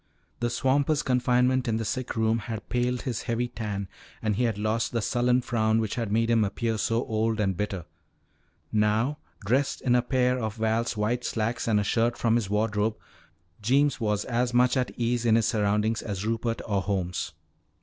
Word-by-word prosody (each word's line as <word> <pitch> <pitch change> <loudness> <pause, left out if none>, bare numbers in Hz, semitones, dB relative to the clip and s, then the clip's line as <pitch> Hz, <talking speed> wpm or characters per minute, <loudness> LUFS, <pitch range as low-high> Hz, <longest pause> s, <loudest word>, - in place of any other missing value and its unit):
The 120 - 0
swamper's 140 +4 +1
confinement 125 0 +2
in 110 -1 +1
the 115 - -3
sick 130 +3 -3
room 110 0 +2
had 110 -1 -6
paled 125 0 0
his 120 -4 -2
heavy 120 0 -1
tan 105 -4 -4 0.3
and 110 -2 0
he 125 +4 +1
had 115 -4 -1
lost 110 +3 -1
the 115 - +1
sullen 125 +2 +2
frown 110 -3 +1
which 110 -2 -1
had 115 -4 -2
made 115 +2 +2
him 115 -2 +4
appear 110 +2 -1
so 115 +3 0
old 110 0 0
and 95 -3 +1
bitter. 95 -3 -3 0.9
Now, 110 +7 +1 0.3
dressed 130 +6 +1
in 125 - +1
a 125 - +4
pair 125 0 +1
of 110 -3 -3
Val's 110 0 0
white 120 +4 0
slacks 115 +1 -2
and 110 -2 +3
a - - +1
shirt 115 +3 +1
from 115 -1 +2
his 115 -4 +1
wardrobe, 105 +1 0 0.6
Jeems 140 +6 +2
was 105 -2 0
as 120 0 0
much 125 +2 +4
at 125 -1 +1
ease 120 0 0
in 115 -2 +4
his 115 -1 +3
surroundings 105 +1 +1
as 100 -2 -4
Rupert 115 +1 -1
or 100 -3 0
Holmes. 95 -2 -2
115 Hz, 190 wpm, -27 LUFS, 105-125 Hz, 0.9 s, him